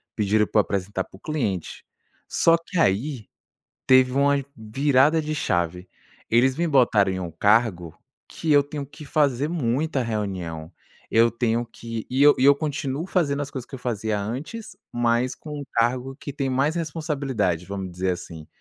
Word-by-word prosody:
pediram 105 0 +2
para - - +2
eu - - +7
apresentar 95 -1 -2
para 95 - -16
o - - -24
cliente. 110 - -3 0.5
Só 165 - +4
que 170 +1 -5
aí, 120 -1 0 0.6
teve 130 -1 +5
uma 140 +1 +2
virada 135 +7 +2
de 155 0 -3
chave. 90 - -1 0.4
Eles 130 +3 +3
me 170 +2 0
botaram 115 -9 +4
em 95 - -3
um 90 -2 -5
cargo 90 -2 +1 0.3
que 160 -2 -1
eu 145 -1 +6
tenho 145 0 -6
que 150 +2 -12
fazer 145 -2 +1
muita 145 -1 -1
reunião, 95 -8 -4 0.4
eu 115 +1 +5
tenho 115 0 0
que 115 -1 -7
e 130 +2 +2
eu 145 0 +8
e 130 - +2
eu 140 +1 +8
continuo 145 0 -3
fazendo 145 -7 0
as 140 - -6
coisas 130 -4 -6
que - - -10
eu - - -6
fazia 110 -3 -2
antes, 140 - -6 0.2
mas 120 +2 +1
com 150 -1 -8
um 145 - -6
cargo 125 +3 0
que 145 - -6
tem 135 -1 -2
mais 140 +6 +1
responsabilidade, 140 - -2
vamos 95 -1 -5
dizer 90 +1 -1
assim. 80 -3 -8
125 Hz, 175 wpm, -24 LUFS, 105-145 Hz, 0.6 s, eu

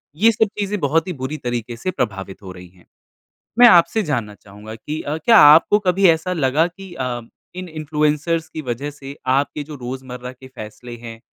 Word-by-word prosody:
ये 220 +8 +4
सब 220 0 +1
चीज़ें 205 0 -2
बहुत 160 +2 +1
ही 180 - -3
बुरी 145 +4 -3
तरीके 120 -3 -4
से 185 +10 -3
प्रभावित 95 - -4
हो 95 -2 -9
रही 90 0 -12
हैं। 90 -1 -24 0.7
मैं 245 - +10
आपसे 215 +2 +5
जानना 120 - -2
चाहूँगा 105 +2 -12
कि 150 +7 -6
अ, 150 +2 -3
क्या 225 +7 +5
आपको 155 +7 +7
कभी 190 -1 +3
ऐसा 165 +3 +1
लगा 155 0 +2
कि 185 +1 -12
अ, 125 -5 -3 0.3
इन 185 0 -6
इन्फ्लुएंसर्स 155 +1 -1
की 155 - -6
वज़ह 130 +1 -4
से 140 -1 -10
आपके 140 +3 0
जो 150 +1 -9
रोज़मर्रा 125 -1 -7
के 130 +1 -14
फैसले 110 +2 -9
हैं 115 -1 -10
145 Hz, 190 wpm, -20 LUFS, 120-170 Hz, 0.7 s, मैं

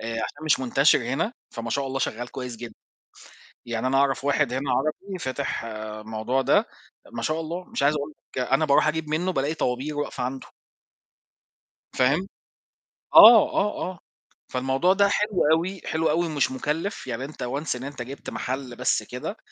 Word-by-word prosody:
آآ، 115 0 -4
عشان 145 +7 -4
مش 155 -4 +3
منتشر 135 +3 +4
هنا، 135 - -1 0.2
فما 115 -1 -5
شاء 140 +2 -1
الله 135 0 -3
شغّال 120 0 -3
كويس 125 -2 -6
جدًا، 120 0 -9 0.9
يعني 120 +1 -2
أنا 135 +1 +2
أعرف 135 0 +2
واحد 145 -3 +2
هنا 135 0 -1
عربي 155 +9 -2
فاتح 130 -4 -3 0.4
موضوع 110 +4 -1
ده، - - +3 0.5
ما - - -5
شاء 155 +1 -1
الله 170 +3 -4
مش 235 - -4
عايز 145 +2 +4
أقول 145 +1 -4 0.2
لك - - -1
أنا 135 +4 +3
باروح 140 +1 +4
أجيب 155 0 -1
منّه 175 +5 0
بألاقي 145 0 0
طوابير 135 +2 -2
واقفة 145 -3 -3
عنده. 130 +1 -4 1.5
فاهم؟ 145 +9 +2 0.9
آه، 225 -1 +10
آه، 210 +1 0
آه 175 - -14 0.5
فالموضوع 135 +8 +2
ده 200 +1 +4
حلو 210 -1 0
أوي، 175 +4 +1
حلو 160 0 0
أوي 170 +3 +2
ومش 150 -5 0
مُكلّف، 150 +7 -3
يعني 125 +1 -3
أنت 150 - -8
once 140 +4 -2
أنت 140 -2 -7
جبت 135 +3 -7
محل 130 -1 -4
بس - - +1
كده - - -6
140 Hz, 170 wpm, -25 LUFS, 130-160 Hz, 1.5 s, آه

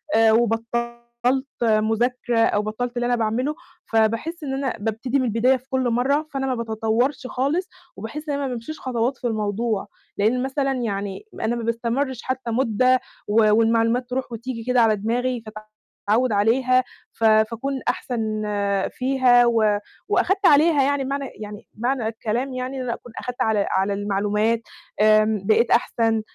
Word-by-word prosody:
آآ، 225 0 +5
وبطّلت 235 +3 -1 0.2
مذاكرة 230 +2 +1
أو 210 -2 +3
بطّلت 235 +4 -4
اللي 240 - 0
أنا 245 0 +2
باعمله. 240 +6 -1 0.3
فباحس 230 +10 0
إن 270 -2 -3
أنا 270 -1 -1
بابتدي 230 +5 -1
من 255 - 0
البداية 245 +3 +3
في 260 +2 -23
كل 260 -2 0
مرّة 280 +6 +1
فأنا 270 0 -1
ما 255 - 0
باتطوّرش 230 +4 -1
خالص 285 +10 -1 0.3
وباحس 300 +1 -7
إن - - 0
أنا 280 - -2
ما - - -1
بامشيش 245 +7 -7
خطوات 250 0 -1
في 245 - -3
الموضوع، 215 -1 -1 0.3
لإن 235 +5 +2
مثلًا 270 0 -1
يعني 205 - -3
ما - - -4
أنا 235 +2 0
ما 235 - -4
باستمرش 235 +3 -2
حتى 260 -2 -3
مدّة 255 +1 +2 0.3
و 215 0 +4
والمعلومات 230 +2 +2
تروح 255 -1 -3
وتيجي 230 0 -5
كده 250 0 +2
على 220 -1 +4
دماغي 240 +3 -1 0.7
فاتعوّد 240 +2 +3
عليها 255 +5 +3 0.3
ف 225 - -8
فاكون 225 +5 +2
أحسن 220 -3 -2 0.5
فيها 255 -2 +4
و 215 -3 +2 0.3
وأخدت 385 0 +1
عليها 295 -1 +5
يعني 280 -1 0
معنى 275 +1 -2
يعني 210 -1 -9
معنى 240 -1 -1
الكلام 230 +4 -2
يعني 255 +1 -4
إن 255 - -3
أنا 235 -2 -2
أكون 245 - -11
أخدت 250 0 -5
على 215 -2 +1
على 195 +1 +1
المعلومات 210 +3 0 0.4
آمم، 215 -1 +4
بقيت 225 +2 +3
أحسن 225 -2 +2
235 Hz, 160 wpm, -23 LUFS, 220-260 Hz, 0.7 s, آآ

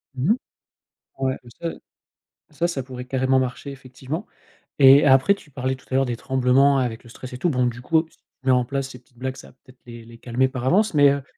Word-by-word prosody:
Mmh 135 +10 +1
mh. - - +4 0.8
Ouais 130 -1 0
et 120 - -14
ça 170 - -1 0.8
ça, 165 +3 -1
ça 140 -7 -3
pourrait 125 -1 -8
carrément 130 0 +1
marcher, 130 +2 -4
effectivement. 135 - -7 0.5
Et 140 +2 +8
après, 135 +8 +5
tu 155 - -18
parlais 130 0 -2
tout 130 - -20
à - - 0
l'heure 135 0 +3
des 120 -2 -3
tremblements 130 +2 +3
avec 120 -3 -3
le 120 - -15
stress 125 +2 -10
et 125 - -5
tout. 175 - +1
Bon, 125 -3 +1
du 120 +1 -5
coup, 160 +4 +2
si - - -27
tu - - -46 0.2
mets 130 - +4
en 125 -1 +3
place 135 +1 -3
ces 125 -3 -11
petites 120 0 -32
blagues, 130 +1 -4
ça - - -12
va - - -21
peut-être 130 -1 -20
les 115 -1 -11
les 115 0 -14
calmer 125 +2 0
par 130 -2 -5
avance. 200 +8 +3
Mais 145 -1 +6
heu, 140 -1 -2
130 Hz, 245 wpm, -23 LUFS, 125-140 Hz, 0.8 s, Et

